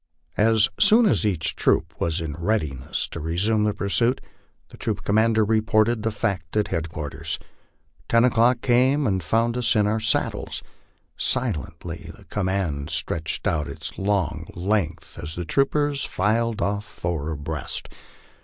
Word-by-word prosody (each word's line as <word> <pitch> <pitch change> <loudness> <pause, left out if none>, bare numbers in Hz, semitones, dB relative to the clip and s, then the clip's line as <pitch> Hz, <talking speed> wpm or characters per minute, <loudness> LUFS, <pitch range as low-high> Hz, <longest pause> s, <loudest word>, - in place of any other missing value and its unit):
As 110 0 +5
soon 230 +2 +6
as 150 - +3
each 80 -5 -1
troop - - +1
was 85 +1 0
in 80 -2 -4
readiness 80 - -1
to - - -6
resume 100 +7 +1
the 105 - +1
pursuit, 115 +5 +1 0.5
the - - -14
troop - - -3
commander 110 +1 +3
reported 110 +1 +2
the 110 - 0
fact 100 -5 -2
at 105 - +1
headquarters. 80 -4 -3 0.7
Ten 115 0 +5
o'clock 120 0 +3
came 130 +4 +3
and 95 -5 +1
found 115 +7 +1
us 125 0 +2
in 105 -1 +4
our 110 +2 +1
saddles. 110 - -1 0.5
Silently 80 +3 -2
the - - -17
command 95 -7 -2
stretched 80 -1 -2
out 75 -3 0
its - - -6
long 95 -5 0
length 85 -4 -2
as 75 +1 -6
the 90 - -4
troopers 140 - +1
filed 110 +2 0
off 100 +1 -1
four 85 -7 -4
abreast. 75 -1 -4
100 Hz, 145 wpm, -24 LUFS, 80-115 Hz, 0.7 s, soon